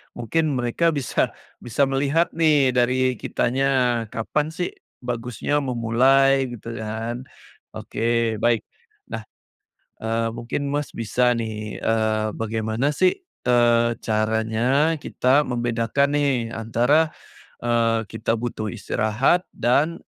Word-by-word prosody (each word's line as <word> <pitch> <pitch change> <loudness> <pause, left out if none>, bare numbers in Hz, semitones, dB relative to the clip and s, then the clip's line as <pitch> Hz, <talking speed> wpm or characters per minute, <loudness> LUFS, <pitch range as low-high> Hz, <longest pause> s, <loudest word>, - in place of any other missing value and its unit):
mungkin 150 +5 0
mereka 145 +8 +1
bisa 135 -3 0 0.3
bisa 120 +3 0
melihat 140 +5 +1
nih 150 -5 +4
dari 125 +1 +2
kitanya, 125 -2 +1
kapan 145 +7 -1
sih 175 +2 -3 0.3
bagusnya 125 +4 -2
memulai 135 +2 +3
gitu 115 +1 -8
kan, 115 +3 -4 0.5
oke 115 -1 -1
baik. 115 -2 +2 0.5
Nah, 110 -1 -5 0.7
eee, 115 +1 -1
mungkin, 120 +4 -3
Mas, 145 0 -2
bisa 120 +3 +1
nih, 110 -2 -5
eee, 110 -1 +1
bagaimana 110 +5 -1
sih, 185 +4 +2 0.2
eee, 120 -1 +3
caranya 110 +7 +1
kita 135 +2 +2
membedakan 120 +2 0
nih 135 -6 +1
antara, 120 +8 +2 0.6
eee, 115 -1 +2
kita 110 +1 -2
butuh 115 -2 -3
istirahat 120 - +1
dan 145 +8 +1
120 Hz, 105 wpm, -23 LUFS, 115-135 Hz, 0.7 s, nih